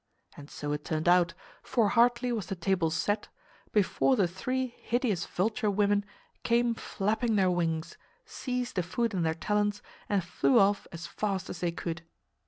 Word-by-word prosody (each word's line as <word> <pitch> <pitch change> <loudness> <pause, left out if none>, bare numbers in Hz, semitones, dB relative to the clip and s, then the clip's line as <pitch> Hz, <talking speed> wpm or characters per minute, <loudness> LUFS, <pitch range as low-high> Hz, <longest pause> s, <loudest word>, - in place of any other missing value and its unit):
And 145 0 -11
so 145 0 -5
it 150 0 -2
turned 155 +1 -2
out, 175 -1 +4 0.3
for 230 -5 +1
hardly 240 +2 +3
was 220 -6 -2
the 195 - -3
table 175 -1 +1
set 205 +6 -1 0.4
before 215 +5 +3
the 200 -6 +3
three 255 +8 -2
hideous 235 -7 0
vulture 215 +3 0
women 205 0 +2 0.4
came 235 0 +2
flapping 220 +2 -1
their 190 -2 +3
wings, 165 -2 -1 0.3
seized 250 -4 -4
the - - +4
food 225 +6 -1
in 185 - 0
their 160 -1 +1
talons 205 +3 0 0.3
and 200 -3 +2
flew 160 -5 +2
off 200 +1 +3
as 170 +1 -7
fast 195 +1 -3
as 175 - -7
they 175 -1 0
could. 170 0 -4
200 Hz, 170 wpm, -29 LUFS, 170-230 Hz, 0.4 s, out